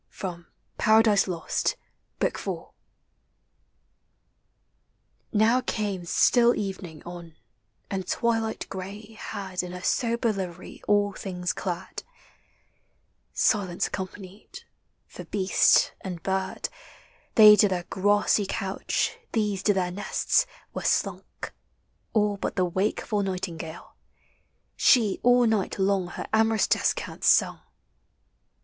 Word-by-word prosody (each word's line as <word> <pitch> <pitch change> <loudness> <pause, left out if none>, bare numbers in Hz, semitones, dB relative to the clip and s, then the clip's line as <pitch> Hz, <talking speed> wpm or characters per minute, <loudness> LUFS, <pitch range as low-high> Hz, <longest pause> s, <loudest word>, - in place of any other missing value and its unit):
FROM 175 -3 -7 0.3
"PARADISE 215 -2 +4
LOST," 170 -3 -1 0.4
BOOK - - 0
IV. - - -3 2.7
Now 225 +3 +3
came 200 -5 -3
still 240 +7 +4
evening 185 -6 -5
on, 170 -2 -10 0.6
and 190 -2 -3
twilight 225 -1 -1
gray 200 +4 -8
Had 195 -4 -5
in 180 0 -7
her 180 0 -8
sober 235 -1 +1
livery 185 -3 -7
all 205 -1 +2
things 180 -2 -3
clad; 175 -3 -5 1.3
Silence 190 -5 +1
accompanied; 190 +1 -7 0.4
for - - -11
beast 190 -2 +3
and 180 -4 -6
bird, 190 0 -2 0.7
They 210 -1 +10
to 210 - +5
their 180 -2 -2
grassy 205 +2 +1
couch, 195 0 -2
these 210 -4 0
to 205 - +3
their 180 -2 0
nests, 205 - +1 0.3
Were - - -4
slunk, - - -2 0.6
all 210 -2 +1
but - - -3
the 185 - +2
wakeful 205 +3 -1
nightingale; 180 -4 -5 0.8
She 225 -7 +4
all 245 0 +5
night 220 -4 0
long 195 -2 +1
her - - -6
amorous 220 0 +3
descant - - -1
sung. - - +4
195 Hz, 105 wpm, -26 LUFS, 185-215 Hz, 2.7 s, They